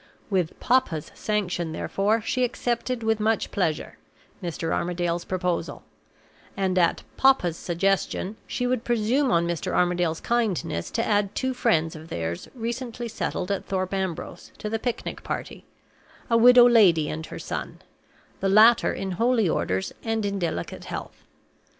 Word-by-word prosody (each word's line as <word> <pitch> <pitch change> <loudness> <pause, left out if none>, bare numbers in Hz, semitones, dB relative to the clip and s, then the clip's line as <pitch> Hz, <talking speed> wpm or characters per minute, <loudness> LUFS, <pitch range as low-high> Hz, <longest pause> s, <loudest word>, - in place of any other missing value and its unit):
With 180 -4 0
"papa's" 240 - +1
sanction, 180 -6 -2
therefore, 210 +7 0
she 255 +4 0
accepted, 245 0 -1
with 220 -1 +1
much 220 +1 0
pleasure, 170 -6 -2 0.4
Mr. 165 -2 -3
Armadale's 175 0 -1
proposal; 180 -2 -2 0.7
and, 190 -1 +1
at 170 -1 +2
"papa's" 260 -11 +4
suggestion, 195 +3 -1
she 245 - -2
would 250 -2 0
presume 240 +4 +1
on 170 -6 +3
Mr. 170 -1 -2
Armadale's 175 -2 +1
kindness 205 -9 -1
to 230 - -1
add 205 -1 +1
two 260 0 -1
friends 165 -11 +1
of 155 +1 -10
theirs 85 0 -4
recently 240 0 -4
settled 200 -4 -3
at 200 - -2
Thorpe 185 0 -2
Ambrose, 190 -4 -4
to 210 - -5
the 225 - -1
picnic 245 +1 -4
party - - -5 0.7
a - - +5
widow 245 +1 +8
lady 185 -10 +5
and 160 +1 -4
her - - -8
son; - - -5 0.6
the 195 - 0
latter 220 +4 +6
in 195 -1 -4
holy 230 +2 +2
orders 95 - -1
and 225 -2 -1
in 200 -1 -2
delicate 165 - -3
health. - - -7
195 Hz, 145 wpm, -25 LUFS, 175-230 Hz, 0.7 s, widow